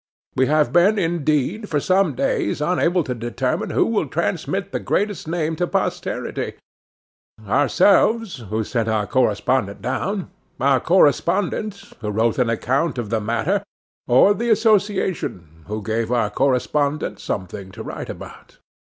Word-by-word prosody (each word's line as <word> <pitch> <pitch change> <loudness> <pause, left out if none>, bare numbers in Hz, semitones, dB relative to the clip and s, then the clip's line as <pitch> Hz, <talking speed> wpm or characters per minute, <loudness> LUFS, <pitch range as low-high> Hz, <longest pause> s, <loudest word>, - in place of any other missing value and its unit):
We 130 0 +3
have 150 0 +2
been, 190 +5 +5
indeed, 165 - 0
for 150 - +1
some 185 -2 +2
days 130 - 0
unable 175 +2 +1
to 130 - -3
determine 120 -1 -2
who - - +2
will - - 0
transmit - - -2
the - - -2
greatest 205 -5 -1
name 160 -1 -1
to 175 - 0
posterity; - - -2 0.9
ourselves, 185 - +3
who 110 +1 -1
sent 115 0 -1
our 110 -2 +1
correspondent 120 -3 +1
down; 190 +9 -2 0.3
our 135 0 +3
correspondent, 185 - +2 0.2
who 105 -3 -4
wrote 110 +4 +1
an 125 -2 +2
account 130 +7 0
of 115 -3 -4
the 110 -1 +1
matter; 115 - 0 0.5
or 130 +11 +6
the 235 +3 -2
association, 200 - +1 0.2
who 105 0 -4
gave 115 +1 -1
our 115 -4 +1
correspondent 140 +3 0
something 95 +1 -5
to - - -8
write - - -6
about. - - -10
145 Hz, 140 wpm, -21 LUFS, 115-185 Hz, 0.9 s, or